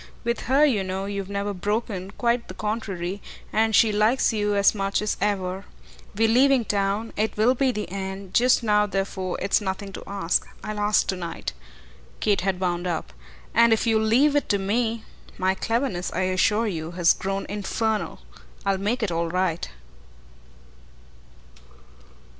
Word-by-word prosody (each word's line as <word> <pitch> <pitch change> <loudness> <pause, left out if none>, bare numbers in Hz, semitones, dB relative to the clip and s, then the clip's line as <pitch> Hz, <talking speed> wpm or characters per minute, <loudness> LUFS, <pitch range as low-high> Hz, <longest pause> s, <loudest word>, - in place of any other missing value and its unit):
With 235 -1 -2
her, 280 +3 +5
you 225 -9 +2
know, 190 +1 -3
you've 200 -1 -4
never 200 0 -2
broken, 200 0 -2
quite 235 0 +1
the 185 - -9
contrary, 200 -3 -3 0.3
and 220 0 +3
she 225 - +5
likes 215 +4 +2
you 210 -1 0
as 200 0 +4
much 195 -1 -1
as 210 0 -1
ever. 190 -2 -1 0.5
We're 225 +2 +3
leaving 255 +1 +4
town; 205 +2 -1
it 215 +1 -1
will 225 +4 +4
be 260 0 +1
the 210 -3 -4
end; 190 -1 -5
just 250 0 +4
now 210 -1 +3
therefore 195 -1 -2
it's 195 +2 +2
nothing 195 0 -4
to - - -7
ask. 195 -3 0 0.2
I'll 215 0 -4
ask 210 0 +3
to 190 - -1
night," 170 - -5 0.7
Kate 205 -4 +2
had 190 0 -1
wound 175 -1 -1
up, 170 -3 -3 0.4
"and 235 0 +5
if 225 - +1
you'll 220 -1 +3
leave 255 +7 +3
it 290 - +1
to 205 - +3
me 225 +3 -1 0.3
my 185 0 +2
cleverness, 215 -3 -1
I 185 - -1
assure 185 +4 +2
you, 165 -5 -4
has 170 -1 +4
grown 195 +1 -3
infernal 210 +2 -2 0.4
I'll 195 -1 +1
make 225 +5 -1
it 200 - 0
all 170 0 0
right." 180 -1 -1
205 Hz, 165 wpm, -24 LUFS, 190-225 Hz, 0.7 s, her